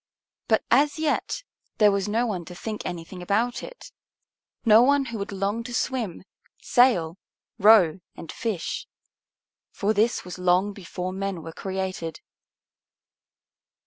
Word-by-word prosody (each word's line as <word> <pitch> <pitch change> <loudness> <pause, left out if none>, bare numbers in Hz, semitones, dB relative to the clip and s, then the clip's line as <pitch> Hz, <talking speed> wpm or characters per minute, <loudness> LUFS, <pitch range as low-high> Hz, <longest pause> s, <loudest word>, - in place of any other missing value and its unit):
But 220 - +3
as 285 +4 +4
yet 315 +9 -1 0.3
there 210 -2 +6
was 200 0 -1
no 230 +3 +1
one 195 -7 -3
to 180 - -10
think 215 +3 -5
anything 175 +1 -7
about 220 +7 0
it, - - -11 0.7
no 220 0 +7
one 280 +2 +4
who 230 -4 -5
would 200 - -4
long 200 +4 -2
to 245 0 -5
swim, 230 - -2 0.4
sail, 195 -9 +3 0.4
row, 195 -5 +6 0.2
and 160 - -8
fish. 215 -8 -3 0.8
For 210 +1 0
this 220 0 +1
was 180 0 -8
long 180 +3 +2
before 185 -1 -5
men 195 -3 -4
were 165 - -8
created. 185 -4 -4
200 Hz, 135 wpm, -25 LUFS, 180-230 Hz, 0.8 s, no